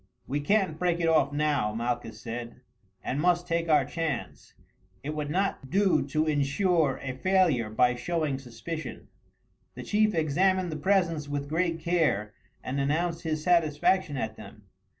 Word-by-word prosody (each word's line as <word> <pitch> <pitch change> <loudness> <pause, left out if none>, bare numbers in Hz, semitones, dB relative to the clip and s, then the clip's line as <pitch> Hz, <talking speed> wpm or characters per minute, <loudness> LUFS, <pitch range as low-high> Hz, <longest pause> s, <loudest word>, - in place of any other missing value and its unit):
"We 145 +3 -2
can't 175 0 +1
break 175 -1 +1
it 165 - +1
off 155 -4 +3
now," 145 -8 0
Malchus 120 -1 -3
said, 120 +1 -7 0.4
"and 140 +3 -2
must 175 0 +2
take 170 -1 -1
our 150 -3 +4
chance. 160 -3 -4 0.5
It 145 - -3
would 150 -1 -3
not 180 -5 -1
do 195 +2 +3
to 155 +3 0
ensure 150 +1 +1
a 130 -2 -3
failure 160 - +2
by 125 +3 +3
showing 150 +1 -2
suspicion." 140 +6 -7 0.7
The - - -7
chief 215 -1 +2
examined 180 +4 +1
the - - -4
presents 165 -3 +1
with 145 0 -3
great 165 +2 0
care 155 - +1 0.3
and 135 +2 -3
announced 165 +4 0
his 155 -2 -2
satisfaction 170 -1 +2
at 110 -3 -3
them. 105 0 -12
155 Hz, 150 wpm, -28 LUFS, 135-175 Hz, 0.7 s, our